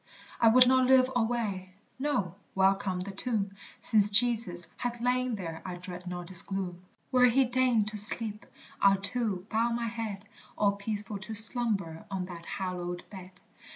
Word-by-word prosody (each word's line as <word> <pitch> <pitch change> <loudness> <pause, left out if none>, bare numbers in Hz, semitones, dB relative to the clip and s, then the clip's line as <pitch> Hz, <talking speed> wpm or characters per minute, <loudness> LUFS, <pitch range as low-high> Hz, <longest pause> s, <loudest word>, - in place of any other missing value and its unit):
I 230 - +5
would 250 +3 +7
not 260 0 +4
live 260 0 +5
alway 220 -6 -2 0.2
no, 230 - -1 0.2
welcome 190 -1 +1
the 195 +2 -6
tomb, 200 -1 -2 0.3
Since 210 -2 +3
Jesus 215 -5 0
hath 240 -1 -4
lain 250 0 0
there 165 -5 -6
I 180 -1 -6
dread 180 0 -9
not 175 0 -6
its 180 - +6
gloom; 185 -3 -5 0.3
Where 250 -1 +5
he 260 +2 +3
deigned 245 -4 +1
to 215 - -6
sleep, 210 +1 0 0.3
I'll 195 0 +5
too 200 -3 -2
bow 230 +2 +1
my 235 0 -2
head, 220 -3 -5 0.3
All 205 -1 +3
peaceful 205 0 -4
to 220 +3 -6
slumber 210 -7 +4
on 190 -2 -3
that 175 -2 -10
hallowed 180 -2 -5
bed. 190 -2 -10
205 Hz, 160 wpm, -29 LUFS, 185-235 Hz, 0.3 s, would